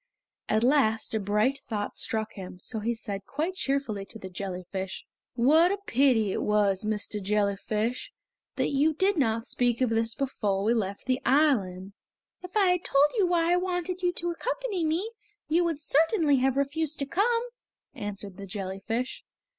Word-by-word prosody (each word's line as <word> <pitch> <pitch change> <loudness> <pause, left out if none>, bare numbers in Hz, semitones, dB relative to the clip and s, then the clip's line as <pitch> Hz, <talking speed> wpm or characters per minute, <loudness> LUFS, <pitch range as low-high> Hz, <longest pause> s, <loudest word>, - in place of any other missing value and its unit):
At 215 +1 +2
last 240 -6 +2
a 220 - +1
bright 210 +7 +1
thought 205 -2 -4
struck 220 -1 -1
him, 185 -2 -8
so 225 - -1
he 230 +3 -1
said 205 -3 -5
quite 315 +6 -2
cheerfully 270 - -1
to 225 - -8
the 190 -3 -9
jellyfish: 190 0 -5 0.3
"What 310 +9 +5
a 400 - 0
pity 255 - +3
it - - -2
was, 205 -2 +2
Mr. 210 0 -2
Jellyfish, 210 +3 -1 0.4
that - - 0
you 295 +3 +2
did 385 +4 +2
not 230 -6 +1
speak 245 -2 0
of 255 -3 +1
this 225 0 0
before 210 -8 -1
we 225 +3 +3
left 200 -4 -2
the 255 0 0
island!" 205 -10 +2 0.5
"If 365 +3 -5
I 390 -3 +5
had 360 0 0
told 285 +2 +4
you 380 - +4
why 345 -1 +2
I - - +4
wanted 360 0 -2
you 355 -1 +2
to 345 0 -2
accompany 450 0 -2
me 335 +8 0 0.4
you 330 +3 +3
would 330 -4 -1
certainly 310 0 +3
have 265 +1 +1
refused 300 +2 0
to 280 - -1
come," 460 - +1 0.5
answered 205 -5 -6
the 200 -1 -8
jellyfish. 200 +5 -4
250 Hz, 170 wpm, -28 LUFS, 210-320 Hz, 0.5 s, What